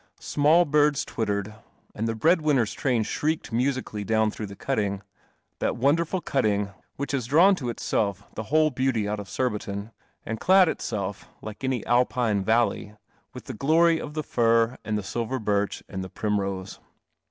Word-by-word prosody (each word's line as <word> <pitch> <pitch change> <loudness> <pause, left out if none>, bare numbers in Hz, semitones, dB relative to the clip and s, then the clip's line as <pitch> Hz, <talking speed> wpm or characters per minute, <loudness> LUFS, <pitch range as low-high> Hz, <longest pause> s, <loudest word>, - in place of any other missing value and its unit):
Small 155 +4 +3
birds 150 -1 +2
twittered, 105 -2 -2 0.4
and 110 +2 -2
the 115 - -1
breadwinners' 150 - +2
train 125 -5 0
shrieked 155 +5 -2
musically 125 -3 -1
down 110 +1 +2
through 105 0 -6
the 100 - -10
cutting 105 -5 -2 0.3
— - - -46
that - - -1
wonderful 165 +8 +1
cutting 105 -9 0 0.2
which 140 - -4
has 130 -5 -2
drawn 170 +9 +6
to 135 -10 -3
itself 100 -4 -1
the 110 - -5
whole 155 +1 +4
beauty 130 -5 0
out 105 0 -2
of 100 - -8
Surbiton, 105 -4 -3 0.3
and 110 0 -4
clad 190 0 +5
itself, 100 -10 -4
like 110 +3 -8
any 130 -3 -1
Alpine 120 -4 +2
valley, 110 -1 +1 0.4
with - - -8
the - - -6
glory 165 +6 +3
of 150 0 -7
the 155 - -2
fir 115 -1 +2
and 110 -1 -1
the 105 - -3
silver 120 +6 -3
birch 105 -3 -1
and 95 -1 -5
the 95 - -7
primrose. 100 -3 -3
115 Hz, 165 wpm, -26 LUFS, 105-140 Hz, 0.4 s, drawn